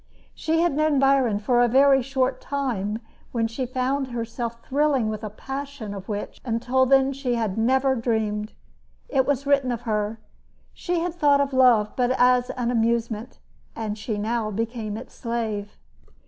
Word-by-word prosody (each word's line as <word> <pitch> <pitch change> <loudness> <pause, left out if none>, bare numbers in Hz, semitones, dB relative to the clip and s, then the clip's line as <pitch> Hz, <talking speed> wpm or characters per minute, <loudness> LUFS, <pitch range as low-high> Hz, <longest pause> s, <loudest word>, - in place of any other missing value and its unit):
She 325 +1 0
had 345 -3 +2
known 305 -1 +2
Byron 265 -6 +3
but 250 - +1
a 245 0 +5
very 270 +2 +5
short 260 0 -1
time 230 -8 -2 0.3
when 230 -2 0
she 245 +3 -4
found 260 +2 -1
herself 235 -1 -5
thrilling 275 -5 +1
with 215 0 -5
a 215 - -3
passion 270 -1 -6
of 195 0 -8
which 205 -1 -5
until 250 +2 +1
then 270 +1 +4
she 260 -3 -2
had 220 -5 -1
never 265 +4 +2
dreamed. 220 -3 -1 0.6
It 265 -2 +2
was 280 -1 0
written 275 -2 +2
of 235 -1 -3
her: 215 -1 -1 0.5
She 350 -2 -2
had 350 0 -2
thought 290 -4 +3
of 280 -1 0
love 245 -5 +4
but 245 -1 +1
as 250 0 +4
an 245 -1 -2
amusement; 230 -1 -1 0.4
yet 215 -2 -3
she 215 0 -4
now 220 +1 -1
became 220 0 -3
its 240 - -10
slave. 220 -3 -4
245 Hz, 165 wpm, -24 LUFS, 220-270 Hz, 0.6 s, a